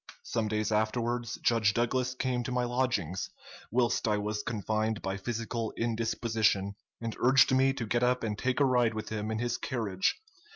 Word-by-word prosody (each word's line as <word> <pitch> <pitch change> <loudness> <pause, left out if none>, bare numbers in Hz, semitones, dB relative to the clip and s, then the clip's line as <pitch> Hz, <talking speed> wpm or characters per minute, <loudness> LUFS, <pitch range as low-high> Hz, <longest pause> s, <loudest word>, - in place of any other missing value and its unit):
Some 115 -2 -1
days 110 0 -1
afterwards 120 +2 0
Judge 110 -3 +3
Douglas 125 +2 0
came 125 -1 -1
to 125 - -3
my 125 0 +1
lodgings, 120 - -1 0.4
whilst 120 0 +1
I 105 -1 +2
was 105 0 -2
confined 110 0 -1
by 95 0 -1
physical 115 +2 -3
indisposition, 110 -3 +1 0.3
and 115 -1 -4
urged 130 +1 +5
me 135 +1 +4
to 130 -4 -4
get 120 +2 0
up 125 0 +2
and 105 -2 -1
take 130 +5 -1
a 140 - +5
ride 120 -4 +3
with 110 - -4
him 110 0 -3
in 110 - -1
his 120 +1 -1
carriage. 105 - -1
115 Hz, 175 wpm, -30 LUFS, 110-125 Hz, 0.4 s, urged